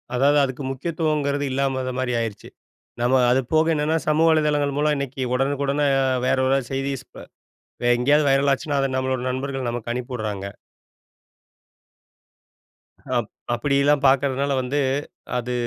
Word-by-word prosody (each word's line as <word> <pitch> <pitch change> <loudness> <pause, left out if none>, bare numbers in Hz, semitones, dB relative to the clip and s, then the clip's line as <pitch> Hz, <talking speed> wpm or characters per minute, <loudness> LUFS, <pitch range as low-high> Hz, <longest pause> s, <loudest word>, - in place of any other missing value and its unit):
அதாவது 140 +3 +3
அதுக்கு 135 0 -3
முக்கியத்துவம்ங்கறது 145 -1 -1
இல்லாத 130 -1 -1
மாரி 125 -1 -1
ஆயிருச்சு. 115 -3 -5 0.5
நம்ம 125 +2 +3
அதுபோக 155 +6 +2
என்னன்னா, 155 +2 +1
சமூக 155 +2 +3
வலைதளங்கள் 150 -3 +1
மூலம் 150 0 +2
இன்னைக்கு 140 -1 -4
உடனுக்குடன 140 +2 0 0.4
வேற 130 - +2
யாராவது 135 -2 +1
செய்திஸ் 135 -1 -3
வ - - -9 0.6
வேற 120 - +2
எங்கயாவது 145 +4 +3
வைரல் 140 +1 +3
ஆச்சுன்னா, 145 +1 -1
அத 135 - +1
நம்மளோட 130 -1 -1
நண்பர்கள் 130 -1 -3
நமக்கு 120 0 -4
அனுப்பிஉடுறாங்க. 110 -5 -4 2.7
அப் 120 -3 -1 0.3
அப்டிலாம் 140 +3 +2
பாக்றதுனால 140 +1 +2
வந்து, 130 +3 -2 0.6
அது 125 0 -4
135 Hz, 125 wpm, -23 LUFS, 125-145 Hz, 2.7 s, அதாவது